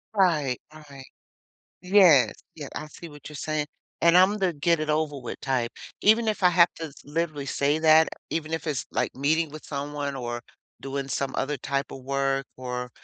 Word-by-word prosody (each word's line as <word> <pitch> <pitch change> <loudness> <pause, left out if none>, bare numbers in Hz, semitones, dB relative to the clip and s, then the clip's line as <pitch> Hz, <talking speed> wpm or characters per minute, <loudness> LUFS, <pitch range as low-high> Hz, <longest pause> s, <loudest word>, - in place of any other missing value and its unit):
Right, 155 -10 +2
right. 145 -3 -12 0.8
Yes, 180 -8 +6 0.2
yeah, 150 -4 -7
I 155 - -4
see 170 +2 -11
what 145 0 -12
you're 150 - -11
saying; 155 0 -2 0.3
and 170 +1 +5
I'm 195 +3 +5
the 185 -3 +1
get-it-over-with 155 -4 -1
type, 130 -4 -1 0.3
even 220 +2 +4
if 210 -2 -1
I 180 - +7
have 175 0 +5
to 160 -3 -6
literally 150 -2 -3
say 145 +3 +1
that, 160 0 +6 0.2
even 160 0 -3
if 160 0 -5
it's, 140 -3 -2
like, - - -1
meeting 155 +3 +1
with 155 0 -10
someone 145 0 -4
or 120 -2 -4 0.4
doing 135 +1 -4
some 135 0 -2
other 145 +2 -1
type 140 +2 -3
of 135 - -9
work 135 0 0
or, 125 -1 -5
150 Hz, 170 wpm, -26 LUFS, 135-165 Hz, 0.8 s, I